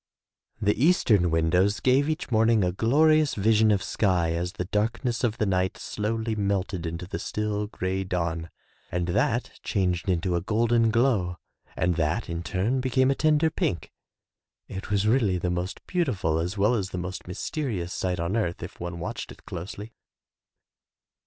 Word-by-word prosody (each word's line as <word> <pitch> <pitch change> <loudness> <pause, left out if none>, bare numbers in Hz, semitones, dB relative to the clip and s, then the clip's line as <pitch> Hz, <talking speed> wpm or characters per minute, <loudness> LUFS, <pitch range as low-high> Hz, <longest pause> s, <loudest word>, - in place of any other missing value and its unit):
The 105 +4 +1
eastern 110 - +4
windows 90 +6 +2
gave 135 +3 +3
each 155 -4 -3
morning 110 -1 +4
a 90 - +1
glori 155 - +4
ous 150 - -1
vision 110 +1 +4
of 100 -3 +2
sky 90 -5 +1
as 90 +2 -2
the 90 -4 -4
darkness 115 +4 -1
of 115 -2 +1
the 110 - +1
night 95 -1 0
slowly 110 +1 -2
melted 100 -4 -1
into 85 +2 -5
the 90 - -5
still, 105 -1 -2
gray 95 -2 -2
dawn, 85 -3 -2 0.4
and 90 0 -1
that 115 +7 +1
changed 95 -2 -1
into 90 0 +1
a 85 - 0
golden 115 +3 +2
glow 110 -7 +1 0.4
and 90 -1 +1
that 85 +7 0
in 85 0 -3
turn 105 +9 0
became 130 +1 +2
a - - +4
tender 155 +1 +3
pink. 85 - -2 0.8
It 95 +3 -7
was 100 0 +1
really 110 -5 +3
the 90 0 -1
most 90 +1 -4
beauti 170 - 0
ful 80 -3 0
as 90 +5 -3
well 105 +4 +3
as 100 -5 -1
the 90 - -5
most 90 +1 -5
mysterious 95 - -3
sight 90 -2 -2
on 85 +5 -1
earth 85 -7 -1
if 85 - -9
one 85 0 -5
watched 85 - -5
it - - -15
closely. 100 +6 -7
100 Hz, 170 wpm, -26 LUFS, 90-115 Hz, 0.8 s, eastern